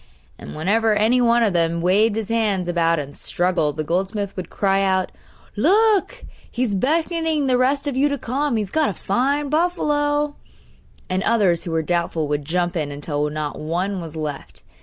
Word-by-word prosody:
And -, -, -9 dB
whenever 210 Hz, +7 st, +1 dB
any 225 Hz, +4 st, +3 dB
one 235 Hz, 0 st, +4 dB
of 210 Hz, -4 st, +1 dB
them 170 Hz, -1 st, +1 dB
waved 205 Hz, +5 st, +3 dB
his 220 Hz, -1 st, -3 dB
hands 210 Hz, -6 st, 0 dB
about 170 Hz, -1 st, +1 dB
and 145 Hz, -1 st, -6 dB
struggled 175 Hz, -4 st, 0 dB
the 155 Hz, -, -1 dB
goldsmith 195 Hz, +5 st, -2 dB
would 185 Hz, -, -6 dB
cry 195 Hz, -1 st, +1 dB
out: 190 Hz, -1 st, +1 dB, 0.4 s
'Look! 420 Hz, -, +2 dB, 0.2 s
he's 245 Hz, -4 st, -1 dB
beckoning 320 Hz, -, 0 dB
the 255 Hz, -1 st, +2 dB
rest 270 Hz, +3 st, +1 dB
of 285 Hz, -3 st, -2 dB
you 280 Hz, +3 st, +2 dB
to 285 Hz, -, -1 dB
come; 270 Hz, +2 st, -1 dB
he's 210 Hz, -3 st, -3 dB
got 315 Hz, -1 st, +2 dB
a 195 Hz, -, -5 dB
fine 275 Hz, -, 0 dB
buffalo!' 295 Hz, -3 st, 0 dB, 0.7 s
And 185 Hz, +1 st, -1 dB
others 195 Hz, -7 st, +2 dB
who 170 Hz, -, -4 dB
were 160 Hz, 0 st, 0 dB
doubtful 170 Hz, -1 st, -1 dB
would 145 Hz, -1 st, -2 dB
jump 175 Hz, +3 st, -1 dB
in, 155 Hz, -4 st, -2 dB
until 145 Hz, +1 st, -2 dB
not 150 Hz, -1 st, -4 dB
one 180 Hz, +5 st, -2 dB
was 165 Hz, -2 st, -8 dB
left. 150 Hz, -3 st, -6 dB
200 Hz, 180 wpm, -21 LUFS, 170-265 Hz, 0.7 s, one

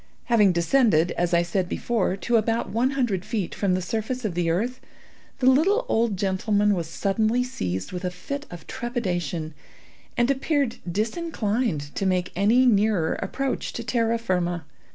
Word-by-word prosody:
Having 210 Hz, -6 st, +4 dB
descended, 175 Hz, -, +3 dB
as 175 Hz, 0 st, -1 dB
I 170 Hz, 0 st, +4 dB
said 175 Hz, +1 st, -1 dB
before, 215 Hz, -5 st, 0 dB
to 240 Hz, +4 st, 0 dB
about 225 Hz, +1 st, +1 dB
one 235 Hz, +4 st, +2 dB
hundred 210 Hz, -9 st, 0 dB
feet 205 Hz, -5 st, -3 dB
from 190 Hz, -3 st, +1 dB
the 185 Hz, -, -2 dB
surface 225 Hz, +4 st, -3 dB
of 200 Hz, -, -1 dB
the 170 Hz, -1 st, 0 dB
earth, 235 Hz, +10 st, -1 dB, 0.6 s
the 260 Hz, -, -1 dB
little 360 Hz, -, +4 dB
old 225 Hz, -, +1 dB
gentleman 205 Hz, +2 st, +1 dB
was 170 Hz, -4 st, -2 dB
suddenly 215 Hz, +7 st, +1 dB
seized 95 Hz, -, -4 dB
with 180 Hz, +1 st, -5 dB
a 180 Hz, -, 0 dB
fit 280 Hz, +11 st, -6 dB
of 175 Hz, -2 st, -10 dB
trepidation, 180 Hz, -, -3 dB, 0.6 s
and 240 Hz, +3 st, +3 dB
appeared 275 Hz, -2 st, 0 dB
disinclined 215 Hz, -, -1 dB
to 195 Hz, -, -1 dB
make 180 Hz, -1 st, 0 dB
any 220 Hz, +7 st, +4 dB
nearer 205 Hz, -7 st, +3 dB
approach 265 Hz, +7 st, -2 dB
to 235 Hz, -, -5 dB
terra 230 Hz, -1 st, +1 dB
firma. 175 Hz, -6 st, -1 dB
210 Hz, 160 wpm, -25 LUFS, 180-240 Hz, 0.6 s, Having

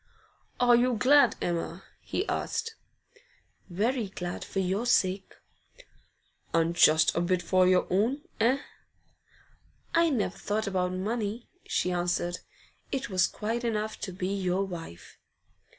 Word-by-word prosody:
'Are 245 Hz, -1 st, +6 dB
you 245 Hz, +1 st, +3 dB
glad, 280 Hz, +6 st, +5 dB
Emma?' 170 Hz, +1 st, -3 dB, 0.2 s
he 390 Hz, -, -3 dB
asked. 460 Hz, -, -2 dB, 1.0 s
'Very 220 Hz, +5 st, 0 dB
glad, 180 Hz, -2 st, -5 dB
for -, -, -8 dB
your 195 Hz, +5 st, 0 dB
sake.' 190 Hz, -5 st, +1 dB, 1.2 s
'And 165 Hz, +1 st, +2 dB
just 155 Hz, -2 st, +5 dB
a 170 Hz, -, +1 dB
bit 175 Hz, 0 st, 0 dB
for 185 Hz, -1 st, +3 dB
your 185 Hz, 0 st, +4 dB
own, 240 Hz, +10 st, +1 dB, 0.2 s
eh?' 250 Hz, +5 st, +2 dB, 1.3 s
'I 335 Hz, 0 st, +4 dB
never 250 Hz, -9 st, -1 dB
thought 215 Hz, +1 st, -1 dB
about 185 Hz, -2 st, -1 dB
money,' 215 Hz, +4 st, -3 dB, 0.2 s
she 180 Hz, -, 0 dB
answered. 175 Hz, 0 st, -1 dB, 0.5 s
'It 265 Hz, -6 st, -3 dB
was 185 Hz, 0 st, +3 dB
quite 230 Hz, +3 st, -3 dB
enough 220 Hz, -2 st, -2 dB
to 190 Hz, -, -5 dB
be 185 Hz, +1 st, -3 dB
your 190 Hz, 0 st, 0 dB
wife. 165 Hz, -, -9 dB
195 Hz, 130 wpm, -28 LUFS, 180-235 Hz, 1.3 s, Are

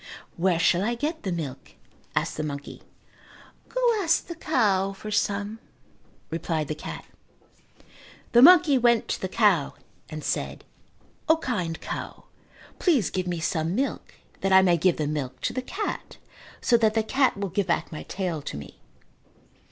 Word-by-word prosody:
"Where 175 Hz, 0 st, +2 dB
shall 170 Hz, +1 st, +3 dB
I 235 Hz, +3 st, 0 dB
get 305 Hz, +7 st, -3 dB
the 190 Hz, -, -3 dB
milk?" 155 Hz, -7 st, -5 dB, 0.4 s
asked -, -, 0 dB
the -, -, -3 dB
monkey. 145 Hz, -1 st, -6 dB, 0.9 s
"Go -, -, -3 dB, 0.2 s
ask 330 Hz, -3 st, +2 dB
the 340 Hz, -, -6 dB
cow 200 Hz, -, +1 dB
for 215 Hz, +2 st, -8 dB
some," 205 Hz, +1 st, -1 dB, 0.7 s
replied 160 Hz, -2 st, -2 dB
the -, -, 0 dB
cat. 155 Hz, -, -8 dB, 1.3 s
The 240 Hz, -, +6 dB
monkey 295 Hz, -3 st, +8 dB
went 235 Hz, -1 st, +3 dB
to -, -, -2 dB
the 190 Hz, -, -1 dB
cow 195 Hz, -9 st, +2 dB, 0.3 s
and 155 Hz, -1 st, -7 dB
said, -, -, -3 dB, 0.7 s
"O, 320 Hz, -, +6 dB
kind 180 Hz, -, -3 dB
cow, -, -, -6 dB, 0.6 s
please 285 Hz, -, +2 dB
give 185 Hz, -1 st, -2 dB
me 175 Hz, -2 st, -2 dB
some 165 Hz, +1 st, -1 dB
milk 270 Hz, +4 st, -3 dB, 0.2 s
that 195 Hz, -, 0 dB
I 190 Hz, 0 st, +7 dB
may 175 Hz, -2 st, +4 dB
give 170 Hz, +1 st, +2 dB
the 155 Hz, -, -1 dB
milk 135 Hz, -4 st, -3 dB
to 225 Hz, -, -1 dB
the 255 Hz, -, -2 dB
cat 390 Hz, +11 st, -5 dB, 0.4 s
so 240 Hz, -, +4 dB
that 220 Hz, -1 st, +2 dB
the 220 Hz, -, +2 dB
cat 260 Hz, +1 st, +2 dB
will 200 Hz, -1 st, -3 dB
give 190 Hz, +2 st, -1 dB
back 170 Hz, -, 0 dB
my 155 Hz, -, -6 dB
tail 180 Hz, -5 st, -3 dB
to 105 Hz, -, -6 dB
me." 70 Hz, -, -11 dB
195 Hz, 165 wpm, -26 LUFS, 165-235 Hz, 1.3 s, monkey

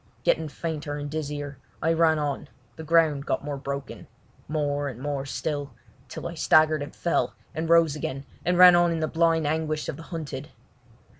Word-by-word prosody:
Getting 160 Hz, -1 st, +2 dB
fainter 150 Hz, -1 st, -4 dB
and 145 Hz, 0 st, -5 dB
dizzier, 145 Hz, -3 st, -4 dB, 0.2 s
I 165 Hz, -, +2 dB
ran 160 Hz, -1 st, +4 dB
on; 145 Hz, -2 st, -3 dB, 0.3 s
the 160 Hz, -, -8 dB
ground 155 Hz, -3 st, +3 dB
got -, -, -1 dB
more 145 Hz, -1 st, -3 dB
broken—more 145 Hz, +1 st, -4 dB
and 125 Hz, -4 st, -6 dB
more 140 Hz, 0 st, -3 dB
still, 145 Hz, -2 st, -3 dB, 0.4 s
till 170 Hz, -, -5 dB
I 170 Hz, -, -6 dB
staggered 155 Hz, -2 st, +4 dB
and 145 Hz, +2 st, -7 dB
fell, 170 Hz, -, 0 dB, 0.2 s
and 160 Hz, +1 st, -3 dB
rose 165 Hz, -3 st, +5 dB
again, 135 Hz, -2 st, -4 dB, 0.2 s
and 180 Hz, 0 st, +1 dB
ran 180 Hz, -1 st, +9 dB
on 175 Hz, 0 st, +4 dB
in 165 Hz, -, -1 dB
the 155 Hz, -, 0 dB
blind 165 Hz, -1 st, +2 dB
anguish 155 Hz, 0 st, -1 dB
of -, -, -4 dB
the -, -, -9 dB
hunted. 150 Hz, -5 st, -5 dB
155 Hz, 175 wpm, -26 LUFS, 145-165 Hz, 0.4 s, ran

